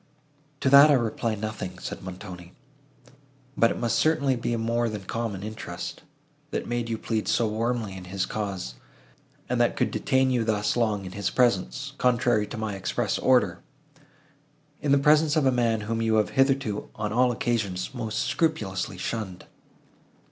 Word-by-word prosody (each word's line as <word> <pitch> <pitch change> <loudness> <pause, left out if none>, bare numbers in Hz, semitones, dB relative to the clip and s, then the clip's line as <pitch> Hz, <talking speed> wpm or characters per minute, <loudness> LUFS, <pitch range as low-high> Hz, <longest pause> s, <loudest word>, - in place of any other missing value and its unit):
"To 135 - +3
that 140 +2 +9
I 145 - +6
reply 115 -2 -1
nothing," 105 -4 -5
said - - -6
Montoni; 90 -1 -9 1.0
"but 115 - +4
it - - -3
must 120 -1 0
certainly 150 -4 +2
be 120 0 -3
a 120 - 0
more 115 +1 0
than 105 -2 -5
common 105 -1 -3
interest, 105 -5 -6 0.5
that - - -3
made 120 -1 -2
you 115 - -1
plead 110 -1 -2
so 115 - +2
warmly 110 -1 -2
in 95 -1 -8
his 95 +1 -2
cause, 95 - -4 0.7
and - - +1
that - - +2
could - - 0
detain 130 0 +2
you 120 -2 +1
thus 105 -2 0
long 110 -5 0
in 90 - -7
his 100 +1 -2
presence, 95 - +1
contrary 120 -4 +2
to - - -7
my 110 -1 -3
express 95 -1 -1
order—in 145 - -3
the 140 - +6
presence 150 +2 +4
of 155 -3 +2
a 130 - +5
man, 115 -3 +1
whom 115 +2 -2
you 110 -1 +2
have 105 -1 +2
hitherto, 135 -6 +1
on 105 -1 -3
all 125 +1 +4
occasions, 110 -5 -2
most 110 -3 -2
scrupulously 95 - -1
shunned!" 95 -2 -4
115 Hz, 165 wpm, -26 LUFS, 105-130 Hz, 1.0 s, that